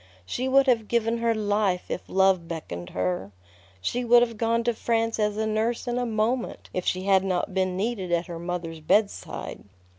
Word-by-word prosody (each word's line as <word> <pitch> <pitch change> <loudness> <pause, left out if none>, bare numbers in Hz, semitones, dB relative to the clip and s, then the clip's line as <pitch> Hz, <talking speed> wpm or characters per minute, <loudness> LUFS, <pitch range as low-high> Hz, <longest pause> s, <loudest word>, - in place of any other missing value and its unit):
She 250 - -2
would 270 +1 +5
have 235 -5 +2
given 230 0 +1
her 230 -1 +1
life 205 -3 0
if - - -2
love 190 -3 +3
beckoned 90 - -6
her. 90 +2 -2 0.5
She 245 - -1
would 240 0 +6
have 230 -1 -2
gone 230 +1 +1
to 240 0 +1
France 225 0 0
as 210 -1 +1
a 220 - 0
nurse 220 +2 0
in 240 0 0
a 245 - -1
moment 230 +3 -1
if 185 - -3
she 185 0 0
had 190 -1 +4
not 185 0 -1
been 185 -1 0
needed 200 -3 -2
at 170 0 +1
her 170 -2 -7
mother's 170 -2 -4
bedside. 205 +7 -1
210 Hz, 190 wpm, -26 LUFS, 180-230 Hz, 0.5 s, would